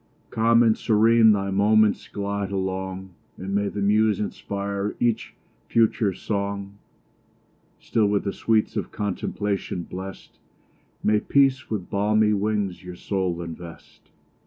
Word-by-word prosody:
Calm 115 +1 +4
and 110 -2 +4
serene 110 0 +4
thy 100 -1 0
moments 105 +1 +3
glide 100 -1 -3
along, 95 0 -3 0.3
And 95 +1 -5
may 100 0 +1
the 100 0 -3
muse 105 0 +3
inspire 100 0 -3
each 115 -2 0 0.3
future 110 -2 +2
song! 100 0 -4 1.0
Still, 110 -3 +1
with 100 0 +1
the 100 - -2
sweets 110 -1 +1
of - - -3
contemplation 100 -2 -3
bless'd, 95 +3 -9 0.6
May 105 0 +3
peace 135 +1 +2
with 100 -5 -4
balmy 105 +1 +2
wings 105 -3 -1
your 90 -1 -8
soul 90 -2 -2
invest! 85 0 -11
100 Hz, 125 wpm, -24 LUFS, 95-110 Hz, 1.0 s, Calm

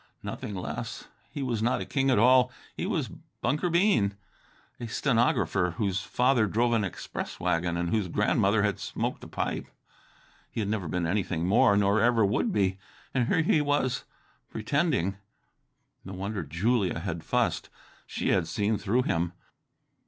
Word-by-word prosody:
Nothing 105 - -5
less. 90 - -5 0.2
He 145 -2 -4
was 120 -4 -1
not 120 +3 +1
a - - -4
king 135 -1 0
at 130 - +4
all. 125 +3 +5 0.2
He - - -3
was - - -1 0.3
Bunker 150 +4 0
Bean, 170 - +3 0.6
a 120 - -5
stenographer, 115 - +1
whose 95 -4 0
father 125 -2 +2
drove 120 +4 +1
an 115 -2 +2
express 95 - -5
wagon, 85 +1 0
and 85 0 -1
whose 105 -4 +1
grandmother - - +2
had - - 0
smoked - - -3
a - - -8
pipe. - - -3 0.8
He - - -5
had 100 -2 -1
never 105 -5 -2
been 90 +2 -1
anything 85 -2 -1
more, 100 0 +5
nor 100 +1 +3
ever 115 -2 +4
would 110 - +1
be. 95 - +1 0.3
And 125 -3 +1
here 165 - +2
he 155 -1 +3
was... 145 -3 0 0.5
pretending. 110 - 0 0.9
No 95 - -8
wonder 100 +2 -3
Julia 90 - 0
had 80 0 -4
fussed! - - 0 0.4
She - - -2
had 90 -4 +2
seen 105 +5 0
through 120 +6 +1
him. 85 -3 -1
105 Hz, 160 wpm, -28 LUFS, 95-125 Hz, 0.9 s, all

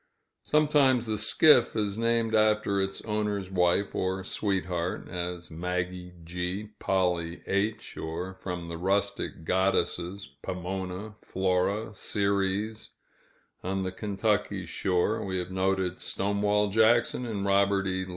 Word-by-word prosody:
Sometimes 145 -5 +3
the 110 -1 -1
skiff 130 +3 +5
is 105 -3 0
named 115 0 +1
after 105 -2 +3
its 95 0 -3
owner's 105 -3 -2
wife 90 +2 +2
or 95 +1 -1
sweetheart, 90 -3 -2
as 90 -1 -5
"Maggie 90 +1 -3
G.," 90 +5 -4
"Polly 90 -3 0
H.," 105 +3 -1
or 85 +4 -4
from 90 -2 -6
the 85 0 -5
rustic 95 -2 -1
goddesses, 95 0 0
"Pomona," 95 +3 -5
"Flora," 95 +4 0
"Ceres;" 100 +2 -1 0.7
on 95 +1 -1
the 95 - -2
Kentucky 105 -1 -1
shore, 90 +1 0
we 95 -1 -2
have 90 0 -3
noted 95 -1 0
"Stonewall 105 +1 +1
Jackson," 115 +3 +3
and 100 -3 -3
"Robert 100 0 +3
E. 95 0 -2
95 Hz, 120 wpm, -28 LUFS, 90-105 Hz, 0.7 s, skiff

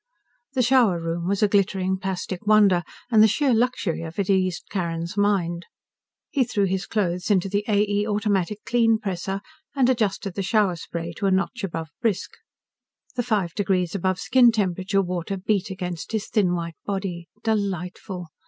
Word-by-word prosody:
The 260 -3 +2
shower 240 -8 +4
room 165 +1 -3
was 200 +2 +1
a - - +6
glittering 190 -2 +1
plastic 190 +1 -4
wonder, 205 -4 +5 0.3
and 220 -2 +6
the 220 - +8
sheer 265 +4 +2
luxury 230 -8 0
of 165 0 -7
it 200 -1 +1
eased 185 -2 +1
Carrin's 170 -1 -3
mind. 185 -4 0 0.6
He 275 - +3
threw 220 -4 0
his 190 0 -1
clothes 180 -4 -1
into 195 -2 +3
the 205 +1 0
A. 210 -1 +3
E. 205 +1 0
automatic 210 -1 -1
Kleen 230 -2 +3
presser, 195 -1 -3 0.3
and 260 -2 +4
adjusted 205 -5 -1
the 200 - -3
shower 195 -2 +2
spray 170 0 -6
to 200 - 0
a - - +2
notch 195 +5 0
above 165 -4 -4
"brisk." 220 -6 0 0.8
The 250 - +1
five 205 -8 0
degrees 185 -4 0
above 185 -1 0
skin 250 +1 +5
temperature 195 -2 0
water 180 +1 -3
beat 195 0 0
against 180 0 -5
his 215 -2 -1
thin 185 -5 +2
white 170 -1 -5
body. 190 -4 -4 0.2
Delightful! 190 -4 -2
195 Hz, 170 wpm, -24 LUFS, 180-215 Hz, 0.8 s, the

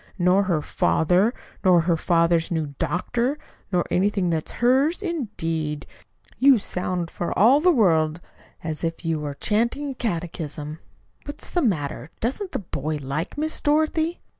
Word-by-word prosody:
"'Nor 185 +2 +3
her 170 -5 0
father, 180 +7 +2 0.3
nor 180 -3 +5
her 170 0 +2
father's 170 0 +2
new 160 -5 -2
doctor, 240 +10 -1 0.3
nor 180 -2 +1
anything 195 -1 +1
that 160 -1 -1
is - - -7
hers,' 270 - +2
indeed! 165 - -3 0.5
You 270 0 +7
sound 180 -3 -3
for 175 - -3
all 240 +9 +6
the 365 - +5
world 165 - +3 0.4
as 160 0 -4
if 165 +1 -3
you 165 -1 0
were 145 -1 -4
chanting 235 - 0
a - - -5
catechism! 160 - -4 0.5
What's 290 - -9
the 350 - +1
matter? 160 - -1
Doesn't 275 - -2
the - - -2
boy 155 -5 -3
like 140 - -4
Miss 315 +1 -1
Dorothy?" 315 +3 +1
180 Hz, 150 wpm, -24 LUFS, 160-245 Hz, 0.5 s, You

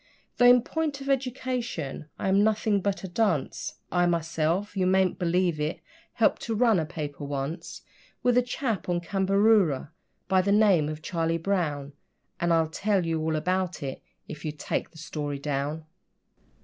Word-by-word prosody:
Though 245 - +6
in 245 -1 +7
point 310 -1 -2
of 275 0 -6
education 250 - -2
I - - -3
am 195 +2 +4
nothing 215 -1 +2
but 200 +1 -1
a - - -3
dunce, 180 -6 -1 0.2
I 175 -1 +3
myself 170 +3 0
you 185 -1 +1
mayn't 190 -1 +2
believe 175 -2 +1
it 150 +2 -2 0.3
helped 225 - +2
to 225 - -2
run 225 -4 +4
a 160 - -2
paper 150 -4 -6
once 140 +3 -5 0.4
With 245 -1 +3
a 250 - +6
chap 240 -7 -3
on 175 -1 +1
Cambaroora, 195 -5 +2 0.4
by 185 0 +4
the 200 +2 0
name 200 -8 +4
of 155 0 -6
Charlie 165 0 0
Brown, 155 -6 -1 0.5
And 170 0 +1
I'll 165 -1 +3
tell 195 +1 0
you 165 -1 -1
all 160 0 0
about 180 +1 -1
it 135 -1 -5 0.3
if 150 -1 -8
you'll 155 -1 -4
take - - -2
the 160 - -18
story 150 -2 -4
down. 145 +2 -3
180 Hz, 170 wpm, -27 LUFS, 155-210 Hz, 0.5 s, in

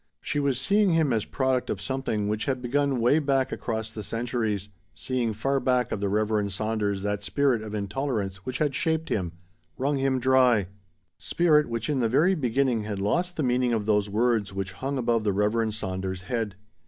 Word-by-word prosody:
She 145 - -2
was 140 -3 +1
seeing 200 +6 +3
him 155 -6 +2
as 110 -2 0
product 130 -2 0
of 100 - -2
something 110 -2 -2
which 105 +1 -1
had 130 -2 -1
begun 135 +1 0
way 125 +7 +4
back 135 -3 +1
across 110 -1 -3
the 110 - -6
centuries, 110 -3 -2 0.3
seeing 125 -3 -1
far 135 +6 0
back 125 -2 +1
of - - -2
the 100 0 -1
Reverend 105 0 0
Saunders 105 -1 -1
that 105 0 -1
spirit 130 +2 +1
of 110 -1 -6
intolerance 105 -2 -2
which 125 +8 -5
had 150 -2 0
shaped 160 +3 0
him 90 -5 -1 0.4
wrung 140 +2 0
him 135 -1 +1
dry 125 -5 +4 0.5
spirit 150 -5 +3
which 115 -1 -2
in 145 -3 0
the 115 -2 +2
very 160 +10 +4
beginning 130 - +1
had 105 -1 -4
lost 175 - 0
the 155 - 0
meaning 125 -1 +2
of 110 -2 -1
those 105 -1 +2
words 110 -1 +1
which 95 -1 -4
hung 135 +9 -3
above 115 -3 +1
the 105 -2 +1
Reverend 105 +2 +1
Saunders' 95 -2 -4
head. 110 -1 -2
115 Hz, 190 wpm, -26 LUFS, 105-135 Hz, 0.5 s, way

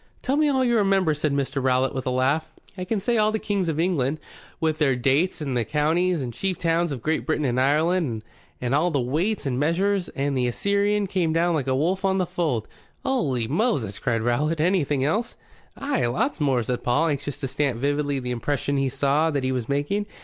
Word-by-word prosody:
"Tell 270 - +1
me 305 +1 +3
all 265 -2 +2
you 240 -1 +3
remember," 195 -5 +3
said 150 0 -1
Mr. 140 0 -1
Rowlatt, 130 +1 +2
with 130 -1 -4
a - - +2
laugh. 135 +5 +1 0.3
"I 185 -2 -5
can 215 +2 -1
say 235 +4 0
all 215 0 +3
the 220 - 0
Kings 200 -5 -1
of 155 -1 -2
England, 155 -4 0 0.4
with 155 -1 0
their 140 -4 +3
dates, 135 +9 +1
and 135 -4 -2
the 120 - +1
counties 155 +4 +1
and 120 -2 -5
chief 190 +6 -2
towns 170 -1 +1
of 130 -5 -5
Great 155 0 0
Britain 155 -2 -1
and 125 0 +1
Ireland, 150 -4 +1 0.4
and 125 +1 -2
all 155 +5 +3
the 145 -5 0
weights 160 - -1
and 130 -2 -1
measures, 180 +5 +1
and 140 0 -1
'The 125 -1 +1
Assyrian 200 - +1
came 180 -4 0
down 170 +1 +2
like 145 -5 -1
a 130 - +1
wolf 180 +8 0
on 190 0 +2
the 185 - +1
fold 165 - -2 0.2
'" - - -36
"Holy 135 - 0
Moses!" 140 - 0
cried 115 -3 0
Rowlatt. 150 +7 0
"Anything 155 -5 +1
else?" 215 - -1 0.4
"Ay. 275 - 0
Lots 150 - -1
more," 130 -5 +2
said 125 +2 -2
Paul, 150 +7 +2
anxious 145 -1 -3
to 140 -2 -4
stamp 135 -2 -1
vividly 145 +1 0
the 125 -1 -4
impression 140 +3 -1
he 135 -1 +1
saw 145 +5 +1
that 140 -4 -1
he 130 - 0
was 125 -3 -3
making. 145 +9 -1
150 Hz, 220 wpm, -24 LUFS, 130-185 Hz, 0.4 s, me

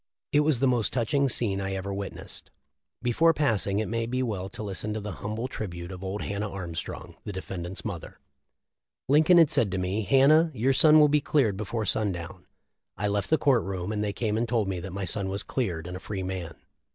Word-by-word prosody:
It 145 - +4
was 150 -2 +3
the 135 +3 +2
most 120 -4 +1
touching 140 +3 +1
scene 100 -6 -1
I 95 0 -2
ever 95 +1 -3
witnessed."* 100 0 -6 0.5
Before 160 +7 +4
passing 110 -9 +1
it 110 - +1
may 115 0 -1
be 130 +2 -1
well 100 -6 -3
to 110 - -7
listen 105 +1 -3
to - - -2
the 105 0 -5
hum 105 +1 -3
ble 115 +3 -2
tribute 90 -7 -6
of 95 0 -8
old 95 +2 -3
Hannah 100 +1 -3
Armstrong, 85 -4 -6
the - - -5
defend 95 -2 -5
ant's 95 +3 -6
mother: 95 -7 -6 0.9
"Lincoln 155 +6 +6
had 165 -3 +6
said 110 -9 +2
to - - 0
me, 95 +4 -1
'Hannah, 140 - +5
your 130 +4 +2
son 155 +3 +7
will 150 - +7
be 150 0 +3
cleared 130 -9 +2
before 110 +2 -3
sundown.' 90 -5 -2 0.5
I 105 +2 0
left 100 -1 -1
the 160 - +4
court 135 -7 +3
room, 95 0 -3
and 105 -1 -1
they 105 - -1
came 110 +1 -1
and 120 0 -1
told 115 -4 +1
me 95 -2 -2
that 95 +2 -6
my 95 +1 -3
son 95 +2 -2
was 100 +1 -2
cleared 90 -11 -2
and 90 +1 -6
a - - -5
free 95 -1 -5
man. 90 -3 -4
105 Hz, 225 wpm, -27 LUFS, 95-125 Hz, 0.9 s, son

